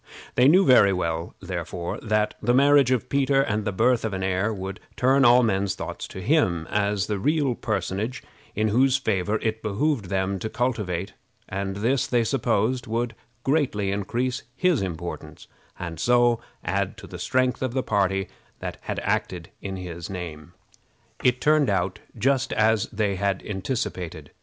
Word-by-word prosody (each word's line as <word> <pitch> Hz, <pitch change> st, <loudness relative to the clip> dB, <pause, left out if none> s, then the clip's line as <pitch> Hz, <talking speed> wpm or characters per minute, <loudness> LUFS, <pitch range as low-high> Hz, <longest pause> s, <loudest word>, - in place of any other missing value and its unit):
They 125 Hz, -, +5 dB
knew 185 Hz, +6 st, +6 dB
very 125 Hz, -8 st, +6 dB
well, 85 Hz, -2 st, -2 dB
therefore, 85 Hz, -1 st, -4 dB
that 110 Hz, -1 st, +1 dB
the 120 Hz, -, +2 dB
marriage 140 Hz, -1 st, +5 dB
of 130 Hz, -3 st, +1 dB
Peter 140 Hz, 0 st, +2 dB
and 105 Hz, -4 st, -1 dB
the 105 Hz, -, 0 dB
birth 115 Hz, +5 st, +2 dB
of 110 Hz, -3 st, -2 dB
an 95 Hz, 0 st, -3 dB
heir 95 Hz, +3 st, 0 dB
would 95 Hz, -2 st, -5 dB, 0.2 s
turn 135 Hz, +2 st, +4 dB
all 125 Hz, 0 st, +7 dB
men's 100 Hz, -3 st, +1 dB
thoughts -, -, -6 dB
to 95 Hz, -, -8 dB
him 90 Hz, -, +2 dB
as 100 Hz, -1 st, +1 dB
the 105 Hz, -1 st, -2 dB
real 145 Hz, +2 st, +1 dB
personage 110 Hz, +2 st, -3 dB, 0.3 s
whose 120 Hz, +5 st, +3 dB
favor 105 Hz, -5 st, 0 dB
it 110 Hz, 0 st, -1 dB
behooved 110 Hz, +3 st, 0 dB
them 95 Hz, +1 st, -1 dB
to 110 Hz, -, -3 dB
cultivate; 105 Hz, -8 st, -2 dB, 0.3 s
and 95 Hz, 0 st, -3 dB
this, 120 Hz, +6 st, +1 dB
they 120 Hz, -2 st, +2 dB
supposed, 120 Hz, 0 st, 0 dB
would 115 Hz, +1 st, -1 dB, 0.3 s
greatly 130 Hz, -9 st, +1 dB
increase 120 Hz, +6 st, -1 dB
his 175 Hz, -, +2 dB
importance, 85 Hz, -4 st, -6 dB, 0.3 s
and 85 Hz, -3 st, -6 dB
so 120 Hz, +3 st, +3 dB, 0.2 s
add 100 Hz, +2 st, -1 dB
to 110 Hz, -, -10 dB
the 90 Hz, -2 st, -9 dB
strength 130 Hz, +7 st, +1 dB
of 130 Hz, -1 st, -2 dB
the 130 Hz, -, +1 dB
party 95 Hz, -2 st, +1 dB, 0.3 s
that -, -, -6 dB
acted -, -, -2 dB
in 95 Hz, -1 st, -4 dB
his 85 Hz, -2 st, -7 dB
name. 85 Hz, -3 st, -7 dB, 0.7 s
It 125 Hz, 0 st, +3 dB
turned 150 Hz, -2 st, +3 dB
out 95 Hz, 0 st, 0 dB, 0.2 s
just 135 Hz, +3 st, +1 dB
as 110 Hz, -1 st, +2 dB
they 100 Hz, -2 st, -1 dB
had 100 Hz, -1 st, -1 dB
anticipated. 95 Hz, -4 st, -4 dB
110 Hz, 160 wpm, -25 LUFS, 95-125 Hz, 0.7 s, all